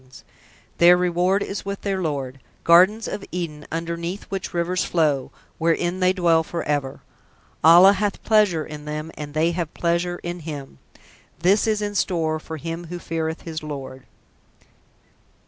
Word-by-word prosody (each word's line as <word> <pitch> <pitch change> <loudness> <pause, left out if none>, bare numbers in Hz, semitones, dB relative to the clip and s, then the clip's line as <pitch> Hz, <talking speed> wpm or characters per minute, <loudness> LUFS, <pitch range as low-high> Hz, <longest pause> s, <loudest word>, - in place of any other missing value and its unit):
P: 130 - -24 0.7
Their 175 +1 +7
reward 180 +2 +1
is 195 - -5
with 200 0 -5
their 195 -2 -2
Lord: 135 -5 -3 0.2
Gardens 185 +6 +5
of 200 - -5
Eden 160 -4 -5
underneath 170 +3 -4
which 195 -1 -4
rivers 175 +1 0
flow, 150 -6 +1 0.3
wherein 175 +2 0
they 185 0 +4
dwell 170 -3 +3
for 170 +1 -4
ever. 145 -2 -2 0.6
Allah 175 +5 +8
hath 205 0 -2
pleasure 205 -8 +3
in 150 -1 -9
them 150 +1 -5
and 150 0 -8
they 160 +2 +2
have 170 -2 -3
pleasure 175 +1 0
in 175 +1 -4
Him. 145 - -8 0.6
This 195 +6 +3
is 215 -1 +1
(in 205 0 -3
store) 165 -5 0
for 160 +1 -7
him 165 +2 -5
who 175 +2 -6
feareth 160 -1 -3
his 160 -2 -5
Lord. 135 -3 -8
170 Hz, 155 wpm, -23 LUFS, 155-185 Hz, 0.7 s, Allah